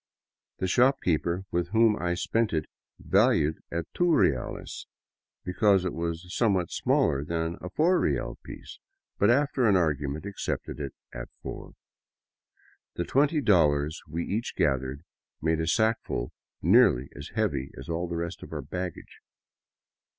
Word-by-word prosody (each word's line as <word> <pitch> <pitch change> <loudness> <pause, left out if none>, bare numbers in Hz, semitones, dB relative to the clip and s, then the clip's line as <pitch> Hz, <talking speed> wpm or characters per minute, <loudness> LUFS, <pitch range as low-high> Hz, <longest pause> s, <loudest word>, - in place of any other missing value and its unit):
The - - -2
shopkeeper 95 - +2
with 85 0 0
whom 110 +2 +4
I 90 -2 -1
spent 115 +4 0
it 80 -1 0 0.3
valued 75 +2 +3
it 85 - -3
at 85 - -5
two 175 -1 +2
reales 70 - 0 0.6
because 95 0 +3
it 90 - -1
was 85 +1 -3
somewhat 95 -7 +1
smaller 70 - +1
than 80 +1 -2
the 90 - -6
four 175 - +3
real - - -1
piece, - - -10 0.4
but - - +4
after 135 -1 +3
an 100 - +4
argument 75 -2 0
accepted 100 -6 -4
it 70 -2 -5 0.2
as - - -6 0.2
four. - - -7 1.2
The 85 - -2
twenty 145 +3 +2
dollars 80 - +3
we 85 +1 -3
each 110 +4 -3
gathered 65 0 0 0.4
made 80 0 +1
a 80 - -1
sackful 110 - 0 0.3
nearly 65 +3 +5
as - - -8
heavy 70 -1 -1
as - - -9
all 85 +1 -2
the 85 0 -3
rest 85 0 -4
of - - -10
our - - -4
baggage. 90 -2 -6
85 Hz, 145 wpm, -27 LUFS, 80-105 Hz, 1.2 s, nearly